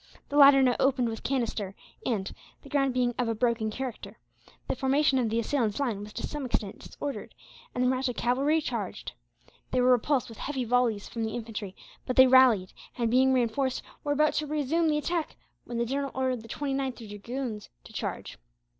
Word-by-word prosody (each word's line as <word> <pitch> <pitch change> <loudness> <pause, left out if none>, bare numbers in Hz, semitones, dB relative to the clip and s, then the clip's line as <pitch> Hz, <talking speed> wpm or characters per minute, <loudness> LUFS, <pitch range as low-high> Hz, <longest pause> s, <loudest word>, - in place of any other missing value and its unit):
The 285 - -4
latter 275 -2 +8
now 250 -2 +3
opened 260 -3 +2
with 225 -1 -5
canister 230 -7 -2 0.3
and, 205 -6 -1 0.3
the 280 - -12
ground 275 -2 +2
being 245 -1 +1
of 245 - +1
a 225 - 0
broken 230 -1 +1
character, 255 +1 -6 0.5
the - - -1
formation 270 +1 +2
of 235 -3 +1
the 225 - -1
assailants' 230 -2 0
line 240 -8 -1
was 205 +1 -8
to - - -4
some 295 -2 -5
extent 215 -5 -2
disordered 285 -1 -6 0.4
and 250 - +1
the - - +3
Mahratta 255 -1 0
cavalry 275 +6 +2
charged. - - -4 0.6
They 255 - 0
were 250 +1 +5
repulsed 250 +1 +2
by 215 - -15
heavy 270 -2 -2
volleys 235 -3 +1
from 230 - -4
the 220 - -3
infantry, 220 -4 -6 0.3
but 255 - -1
they 260 - +9
rallied 255 -7 +5 0.2
and, 235 -2 0
being 260 +2 +4
reinforced, 260 +1 0 0.2
were 290 - +1
about 305 +1 +3
to 300 - -1
resume 305 +3 +1
the 300 -1 +2
attack, 330 +1 -2 0.3
when 240 - -5
the 235 - +1
general 275 +3 -2
ordered 260 -2 0
the 225 - -12
29th 270 -4 -3
Dragoons 215 +2 -5
to - - -14
charge. - - -5
255 Hz, 190 wpm, -28 LUFS, 230-275 Hz, 0.6 s, they